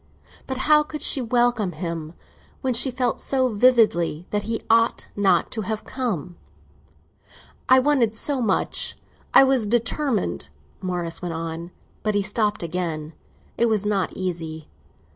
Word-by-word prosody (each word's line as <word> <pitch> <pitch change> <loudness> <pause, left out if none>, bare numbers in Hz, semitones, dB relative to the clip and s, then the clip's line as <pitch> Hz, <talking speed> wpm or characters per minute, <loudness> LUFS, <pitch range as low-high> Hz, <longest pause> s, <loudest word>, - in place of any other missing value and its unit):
But 265 - -3
how 300 0 +6
could 300 0 -6
she 270 - +2
welcome 240 -5 +1
him 165 -2 -5 0.5
when 260 -2 0
she 245 +3 +4
felt 250 -1 -1
so 260 -2 +1
vividly 210 -8 +3
that 210 - 0
he 225 +2 -3
ought 230 0 +3
not 200 -1 +2
to 220 - -3
have 215 +1 -3
come? 185 - -4 1.3
"I 260 - +8
wanted 255 -5 +2
so 270 +4 0
much—I 220 +4 +1
was 265 -5 +2
determined," 230 - 0 0.3
Morris 175 -3 -3
went 175 -2 -4
on. 165 +1 -5 0.3
But 215 -1 -1
he 205 - +2
stopped 210 -1 0
again; 165 -2 -3 0.5
it 235 - +4
was 210 -2 +1
not 200 -4 0
easy. 165 -4 -4
210 Hz, 140 wpm, -23 LUFS, 175-245 Hz, 1.3 s, I